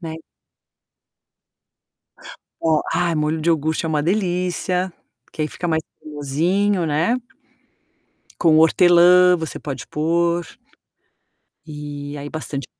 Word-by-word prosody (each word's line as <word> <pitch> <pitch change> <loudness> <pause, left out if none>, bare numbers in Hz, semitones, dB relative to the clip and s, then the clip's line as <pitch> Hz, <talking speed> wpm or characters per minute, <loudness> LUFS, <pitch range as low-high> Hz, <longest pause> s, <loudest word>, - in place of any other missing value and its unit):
Né. 160 -2 -6 2.5
Ó 160 -2 +2
ai, 170 -1 +1
molho 155 +1 -1
de 165 - -1
iogurte 160 0 0
é - - -2
uma 150 -2 0
delícia, 180 0 -1 0.3
porque 155 - -6
aí 155 - -1
fica 175 - -5
mais 160 -1 0 0.2
cremosinho, 165 +6 -1
né. 160 +10 +1 1.2
Com 160 -2 +4
hortelã 175 +2 +6
você 160 -2 -6
pode 135 -3 -6
pôr. 170 +2 0 1.2
E 145 -1 -7
aí 145 +1 -6
bastante 145 -2 -5
160 Hz, 110 wpm, -20 LUFS, 150-175 Hz, 2.5 s, hortelã